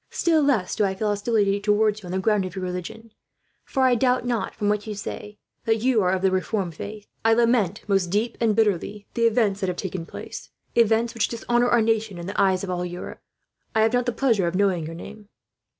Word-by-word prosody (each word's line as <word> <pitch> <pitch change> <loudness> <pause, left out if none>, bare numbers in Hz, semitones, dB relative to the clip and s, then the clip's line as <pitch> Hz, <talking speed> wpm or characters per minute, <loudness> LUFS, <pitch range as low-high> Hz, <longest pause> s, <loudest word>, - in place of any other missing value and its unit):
Still 325 -2 +2
less 250 -11 +1
do - - +1
I 190 -1 0
feel 210 +2 -1
hostility 205 -1 +1
towards 210 +1 +2
you 185 - -10
on - - -6
the 185 - -1
ground 205 +1 +2
of 185 -2 -6
your 190 -1 -3
religion; 180 +5 -6 0.5
for 265 - -1
I 255 -1 +5
doubt 250 +1 +2
not, 240 -2 -2
from 205 - -2
what 210 +1 0
you 210 - -4
say, 210 0 -7 0.3
that 225 0 +1
you 250 -4 +3
are 180 - +2
of 190 0 -1
the 190 - +3
Reformed 185 -1 -1
faith. 210 +6 -8 0.2
I 225 0 +4
lament, 230 -5 +2
most 195 -3 +2
deeply 210 +6 -1
and 215 - +2
bitterly, 205 -1 0
the 230 0 +3
events 215 -3 +1
that 190 - -1
have 180 -1 -2
taken 180 -3 -4
place - - -8 0.2
events 230 0 +3
which 230 -3 +1
dishonour 240 +1 0
our 240 -2 +4
nation 220 -3 0
in 170 - -7
the 200 +2 -1
eyes 190 -1 +2
of 190 - -3
all 180 0 -2
Europe. 175 0 -7 0.5
I 220 - +4
have 220 +2 +3
not 245 0 +1
the - - +2
pleasure 225 -8 +1
of 170 - -2
knowing 185 -5 +1
your 165 - -7
name." 210 +4 -11
210 Hz, 230 wpm, -24 LUFS, 190-230 Hz, 0.5 s, I